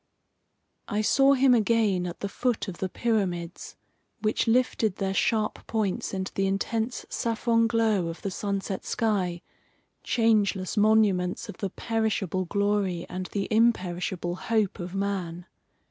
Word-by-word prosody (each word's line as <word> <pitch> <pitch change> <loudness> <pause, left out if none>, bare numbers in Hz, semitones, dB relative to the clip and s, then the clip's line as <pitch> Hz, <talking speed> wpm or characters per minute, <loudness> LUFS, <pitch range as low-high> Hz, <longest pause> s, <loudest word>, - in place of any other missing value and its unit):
I 210 +1 0
saw 270 +5 +4
him 260 -1 +5
again 215 -5 +2
at 175 - -8
the 200 - -1
foot 240 +2 -1
of 190 - -7
the 190 - -2
pyramids, 185 -7 -2 0.5
which 215 +1 +1
lifted 225 -4 +2
their 195 -1 -2
sharp 215 +1 0
points 215 -4 -1
into 190 0 -4
the 195 0 0
intense 220 +5 -2
saffron 230 0 +1
glow 220 -6 +1
of 165 0 -7
the 195 - -2
sunset 200 0 -3
sky, 185 -6 -1 0.6
changeless 210 -5 +1
monuments 205 -4 +2
of - - -8
the 195 - -3
perishable 200 -4 -1
glory 200 -2 0
and 185 0 -4
the 200 -1 -3
imperishable 180 -5 +1
hope 215 0 0
of 175 +1 -6
man. 185 -4 -3
200 Hz, 135 wpm, -27 LUFS, 185-225 Hz, 0.6 s, him